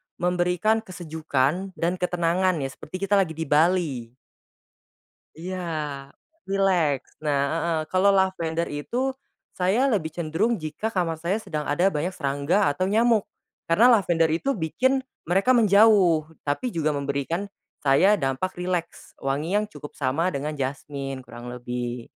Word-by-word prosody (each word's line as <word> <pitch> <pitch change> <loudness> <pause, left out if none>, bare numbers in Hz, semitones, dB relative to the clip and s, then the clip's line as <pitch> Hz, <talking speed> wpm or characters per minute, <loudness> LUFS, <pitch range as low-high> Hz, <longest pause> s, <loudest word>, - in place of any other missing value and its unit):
memberikan 180 +5 +1
kesejukan 165 -1 -2
dan 175 +2 -1
ketenangan 180 +1 +1
ya 135 - -2
seperti 185 +8 -8
kita 200 0 +3
lagi 160 -5 0
di 160 - -3
Bali. 150 -6 +1 1.2
Iya, 185 +3 -5 0.9
rileks, 180 -8 +1 0.2
nah, 145 -2 +2
heeh, 165 0 0
kalau 195 +2 +4
lavender 170 -4 0
itu, 145 +11 -4 0.6
saya 205 +9 +2
lebih 160 - -1
cenderung 170 +8 0
jika 155 +9 -4
kamar 170 -4 0
saya 185 +7 -1
sedang 155 -7 -4
ada 175 +7 +2
banyak 175 +2 -2
serangga 145 +6 +1
atau 185 +6 -1
nyamuk. 225 +1 +3 0.4
Karena 215 +9 +5
lavender 165 -4 +2
itu 175 +13 0
bikin 260 - +1 0.2
mereka 195 +8 +1
menjauh, 200 -7 +5 0.2
tapi 145 - -1
juga 155 -6 0
memberikan, 140 +7 -2 0.3
saya 150 +9 +5
dampak 135 +1 -1
rileks, 180 -2 -4
wangi 150 +8 -1
yang 210 - +1
cukup 180 -8 -11
sama 145 +6 0
dengan 150 0 -3
jasmine 135 -1 -5
kurang 120 +1 -9
lebih. 120 -1 -5
170 Hz, 135 wpm, -25 LUFS, 145-190 Hz, 1.2 s, Karena